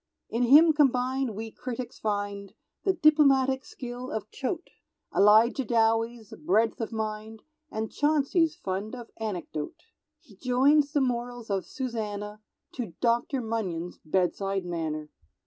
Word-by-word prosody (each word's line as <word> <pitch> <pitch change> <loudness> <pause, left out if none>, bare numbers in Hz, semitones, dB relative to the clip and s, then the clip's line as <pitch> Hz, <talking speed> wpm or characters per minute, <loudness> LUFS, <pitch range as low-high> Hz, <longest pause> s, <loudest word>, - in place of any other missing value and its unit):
_"] - - -2
In 235 - +1
him 310 +6 +7
combined 260 -4 +1
we 220 +1 -6
critics 250 +1 -6
find 205 -2 -3 0.3
The 385 - +3
diplomatic 275 -5 +4
skill 250 0 -7
of 215 -1 -5
Choate, 320 +6 -4 0.4
Elijah 220 +6 +5
Dowie's 225 -1 +1
breadth 220 +8 +2
of 225 - -3
mind, 220 0 -5 0.3
And 220 -3 -4
Chauncey's 310 +2 +2
fund 195 +5 -4
of 240 -2 -10
anecdote; 180 -8 -5 0.4
He - - -19
joins 275 +3 +3
the 290 - +3
morals 245 -3 -2
of 195 -1 -1
Susannah 210 -5 -4 0.3
To 230 -10 -5
Dr. 240 +3 +1
Munyon's 185 -7 -3
bedside 190 +3 0
manner. 155 -3 -3
230 Hz, 130 wpm, -28 LUFS, 210-265 Hz, 0.4 s, him